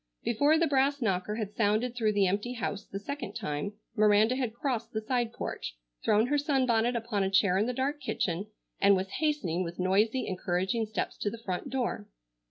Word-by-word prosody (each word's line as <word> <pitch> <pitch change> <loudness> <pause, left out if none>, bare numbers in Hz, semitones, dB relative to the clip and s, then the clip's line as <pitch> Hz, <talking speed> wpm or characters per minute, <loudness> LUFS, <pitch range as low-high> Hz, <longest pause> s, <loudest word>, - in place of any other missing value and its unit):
Before 285 +7 +3
the 335 - +3
brass 280 -1 +2
knocker 210 -3 0
had 210 -2 -4
sounded 220 +3 +1
through 220 -3 +1
the 200 -1 +3
empty 205 +6 -1
house 210 -4 -3
the 195 - -5
second 280 +9 -5
time 150 +7 -3 0.2
Miranda 215 +2 +4
had 255 -4 -1
crossed 240 -1 -3
the 220 - -1
side 240 0 0
porch, - - -5 0.3
thrown 215 +2 +4
her 290 +3 +1
sunbonnet 255 -5 +2
upon 225 -3 -1
a 190 - +1
chair 195 -1 +3
in 215 - +1
the - - 0
dark 275 +4 -2
kitchen, 195 -6 -1 0.3
and 200 0 +6
was 190 0 -2
hastening 255 - 0
with 170 0 -6
noisy, 210 +7 +2
encouraging 190 +4 -1
steps 220 - -3
to 205 - -1
the 230 - -7
front 190 +8 -3
door. 245 - -2
220 Hz, 190 wpm, -29 LUFS, 195-255 Hz, 0.3 s, and